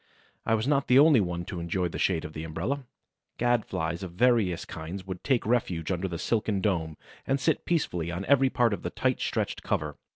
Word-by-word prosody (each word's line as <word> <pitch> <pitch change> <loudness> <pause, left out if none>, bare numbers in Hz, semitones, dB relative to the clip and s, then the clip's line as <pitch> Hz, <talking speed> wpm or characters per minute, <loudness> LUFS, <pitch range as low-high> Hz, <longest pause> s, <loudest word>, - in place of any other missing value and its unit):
I 110 - +4
was 110 +3 -1
not 140 -1 +2
the 125 - +5
only 145 -2 +7
one 85 -2 -3
to 90 - -5
enjoy 90 +2 -1
the 85 - -6
shade 85 -4 +1
of 75 - -8
the 80 - -5
umbrella. 95 - -3 0.5
Gad 120 -2 +2
flies 85 +2 -2
of 90 -3 -6
various 105 -4 +2
kinds 90 +2 -7
would 95 -1 -6
take 130 -4 +1
refuge 95 -8 0
under 95 +1 -1
the 85 -2 -4
silken 105 +2 0
dome 85 -6 -1 0.3
and 135 +1 +1
sit 160 +3 0
peacefully 90 - 0
on 90 +3 -4
every 135 -1 +4
part 120 -4 +2
of - - -4
the - - -3
tightly - - -1
stretched - - -2
cover. 75 -1 -2
95 Hz, 215 wpm, -28 LUFS, 85-120 Hz, 0.5 s, only